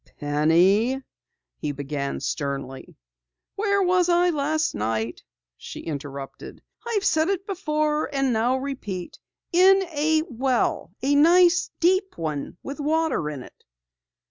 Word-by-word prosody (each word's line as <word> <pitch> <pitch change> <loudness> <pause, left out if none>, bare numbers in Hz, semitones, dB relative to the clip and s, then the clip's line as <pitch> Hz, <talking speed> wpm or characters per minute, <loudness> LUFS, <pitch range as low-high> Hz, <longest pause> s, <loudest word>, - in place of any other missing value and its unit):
"Penny 175 - +3 0.3
" - - -58
he 150 - -1
began 140 0 -4
sternly. 140 -2 -4 0.6
"Where 400 -1 +1
was 360 -1 +2
I 350 +1 +4
last 305 +1 0
night?" 110 +2 -2 0.4
she - - -9
interrupted. 140 -3 -7 0.2
"I've 420 -4 -1
said 320 -2 +2 0.2
before, 305 -6 -1
and 270 -3 +1
now 240 +4 +1
repeat 255 -10 -6 0.3
in 385 +2 +6
a 310 +1 +2
well! 255 - -1
A 280 +2 +2
nice 345 +5 +5
deep 375 +3 +2
one 155 -1 -4
with 280 +2 -7
water 305 - 0
in 140 -4 -6
it." - - -17
275 Hz, 120 wpm, -24 LUFS, -, 0.6 s, in